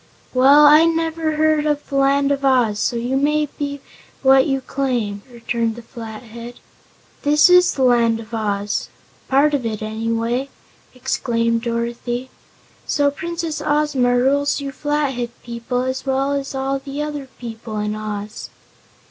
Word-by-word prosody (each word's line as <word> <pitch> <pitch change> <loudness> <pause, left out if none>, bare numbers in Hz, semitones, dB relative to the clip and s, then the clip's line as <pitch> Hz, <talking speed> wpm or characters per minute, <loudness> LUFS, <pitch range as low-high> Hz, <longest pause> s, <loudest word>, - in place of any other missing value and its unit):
"Well, 275 +4 +6
I've 320 +3 +6
never 325 -1 -1
heard 310 0 +2
of 295 -1 -1
the 275 - -5
Land 275 +1 +3
of 280 0 -1
Oz, 245 -6 +2
so 240 - 0
you 240 +3 -1
may 300 +2 +2
be 285 -1 -3 0.4
what 265 0 +5
you 270 -1 0
claim," 245 -7 -2
returned 235 -1 -2
the 240 - -10
Flathead. 230 +1 -9 0.7
"This 300 +4 +5
is 360 0 +6
the 265 - -1
Land 235 -2 +3
of 225 +1 -11
Oz 205 -2 -2 0.4
part 285 +3 +3
of 280 -3 0
it, 220 -2 -3
anyway," 230 +4 -2 0.5
exclaimed 230 -2 0
Dorothy. 240 +2 -3 0.6
"So 285 -1 +2
Princess 330 0 -4
Ozma 290 -5 +2
rules 280 +4 +2
you 280 -1 -5
Flathead 280 -4 -1
people, 235 +1 -3
as 260 0 -3
well 270 +1 0
as 280 -1 -3
all 270 +1 -1
the 280 +2 -5
other 295 -2 -5
people 225 -2 -7
in 210 0 -2
Oz." 215 0 -6
265 Hz, 150 wpm, -20 LUFS, 230-285 Hz, 0.7 s, Well